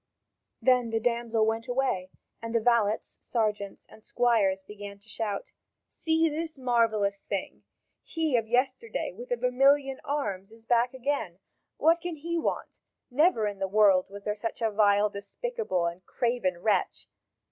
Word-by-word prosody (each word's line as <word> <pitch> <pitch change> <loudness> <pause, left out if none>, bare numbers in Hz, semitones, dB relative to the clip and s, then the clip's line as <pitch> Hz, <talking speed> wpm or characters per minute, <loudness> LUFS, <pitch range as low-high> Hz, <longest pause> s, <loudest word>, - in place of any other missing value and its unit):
Then 250 -2 +4
the 225 0 0
damsel 235 -1 +1
went 225 +2 -1
away, 245 -8 0 0.3
and 230 0 -5
the - - +5
valets, 225 -2 +1
sergeants, 210 -4 -2
and 220 - -17
squires 205 -6 +2
begin 205 0 -9
to 200 +2 -21
shout: 215 -2 -4 0.4
"See 325 0 +1
this 315 0 -4
marvellous 225 -6 +1
thing! 195 -2 -5 0.4
He 320 -5 -1
of 225 -2 +1
yesterday 260 - 0
with - - -9
the - - 0
vermilion 270 - +3
arms 220 -10 -3
is 225 0 -17
back 240 +2 +2
again. 255 -9 -2 0.4
What 330 +2 +4
can 350 -1 -4
he 335 +3 -4
want? - - -3 0.3
Never 285 -4 +3
in 205 -1 -3
the 195 - 0
world 195 -2 +4
was 200 0 -10
there 210 - -1
such 220 +2 -5
a 225 -2 +1
vile, 205 0 +4
despicable, 200 - -2
and 170 +2 -4
craven 205 -6 -1
wretch! 205 -4 0
230 Hz, 155 wpm, -28 LUFS, 205-270 Hz, 0.4 s, the